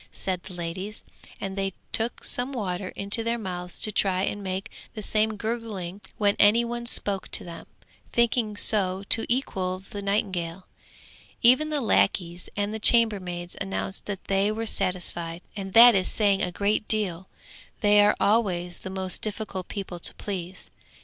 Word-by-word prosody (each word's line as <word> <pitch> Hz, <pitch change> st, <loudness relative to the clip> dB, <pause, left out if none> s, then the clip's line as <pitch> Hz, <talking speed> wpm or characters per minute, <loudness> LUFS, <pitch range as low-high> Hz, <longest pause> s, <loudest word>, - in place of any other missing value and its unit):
said 185 Hz, -2 st, -3 dB
the 185 Hz, -, -11 dB
ladies, 180 Hz, +5 st, -6 dB, 0.4 s
and 195 Hz, -1 st, -5 dB
they 195 Hz, -1 st, -2 dB, 0.2 s
took 230 Hz, +1 st, +5 dB
some 250 Hz, +2 st, +1 dB
water 190 Hz, -5 st, -3 dB
into 200 Hz, +4 st, +1 dB
their 230 Hz, +1 st, -1 dB
mouths 180 Hz, -4 st, -6 dB
to 215 Hz, -, +2 dB
try 190 Hz, -2 st, +1 dB
and 205 Hz, +1 st, -3 dB
make 190 Hz, 0 st, -4 dB, 0.2 s
the 215 Hz, -, -5 dB
same 215 Hz, +1 st, +1 dB
gurgling 210 Hz, -4 st, -5 dB, 0.2 s
when 205 Hz, -1 st, +2 dB
any 225 Hz, +3 st, +5 dB
one 235 Hz, 0 st, -5 dB
spoke 200 Hz, -5 st, -1 dB
to -, -, +3 dB
them, 170 Hz, -1 st, -10 dB, 0.4 s
thinking 235 Hz, -3 st, +1 dB
so 190 Hz, -3 st, +2 dB
to 225 Hz, -, +5 dB
equal 190 Hz, -7 st, -1 dB
the 205 Hz, -, -5 dB
nightingale. 190 Hz, -3 st, -2 dB, 0.8 s
Even 255 Hz, +6 st, +5 dB
the 300 Hz, -1 st, -1 dB
lackeys 180 Hz, -7 st, 0 dB
and 205 Hz, +1 st, -1 dB
the 220 Hz, -, -4 dB
chambermaids 190 Hz, -7 st, +3 dB
announced 195 Hz, 0 st, -4 dB
that 200 Hz, -2 st, -5 dB
they 195 Hz, +1 st, +1 dB
were 225 Hz, +1 st, -3 dB
satisfied, 175 Hz, -4 st, -1 dB
and 195 Hz, -2 st, -6 dB
that 240 Hz, +1 st, +9 dB
is 185 Hz, -2 st, +1 dB
saying 200 Hz, -2 st, +1 dB
a 180 Hz, -, -1 dB
great 205 Hz, +3 st, 0 dB
deal; 190 Hz, -4 st, 0 dB, 0.5 s
they 205 Hz, -1 st, +5 dB
are 205 Hz, +1 st, +4 dB
always 185 Hz, -5 st, +1 dB
the -, -, -8 dB
most 190 Hz, -1 st, -3 dB
difficult 205 Hz, -3 st, -4 dB
people 190 Hz, -4 st, -6 dB
to -, -, -1 dB
please. 190 Hz, -2 st, -6 dB
200 Hz, 165 wpm, -25 LUFS, 185-220 Hz, 0.8 s, that